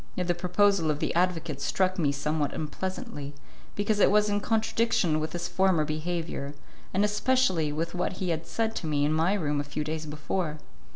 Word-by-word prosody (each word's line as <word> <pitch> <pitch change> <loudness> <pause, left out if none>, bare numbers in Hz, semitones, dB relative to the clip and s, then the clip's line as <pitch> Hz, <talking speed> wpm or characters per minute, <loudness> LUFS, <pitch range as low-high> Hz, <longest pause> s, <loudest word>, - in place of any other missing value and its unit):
Yet 180 - -1
the 175 - +2
proposal 180 0 +2
of 150 - +1
the - - -1
advocate 170 -5 0
struck 185 +4 +1
me 145 -4 +3
somewhat 145 +1 -1
unpleasantly, 160 - -5 0.4
because 205 +1 0
it - - +6
was 210 0 +4
in 205 0 +1
contradiction 225 -7 +1
with 155 +1 -3
his 175 0 -2
former 175 -3 +2
behaviour, 155 -2 -3 0.4
and 195 +2 +2
especially 210 -7 +2
with 165 +3 -2
what 180 +1 -1
he 185 0 -3
had 165 0 -2
said 225 +6 -1
to 160 - -4
me 145 -1 +2
in 150 - +1
my 165 +5 +2
room 150 -6 0
a - - 0
few 145 +1 -3
days 155 +1 -4
before. 155 +2 -2
170 Hz, 190 wpm, -28 LUFS, 155-195 Hz, 0.4 s, it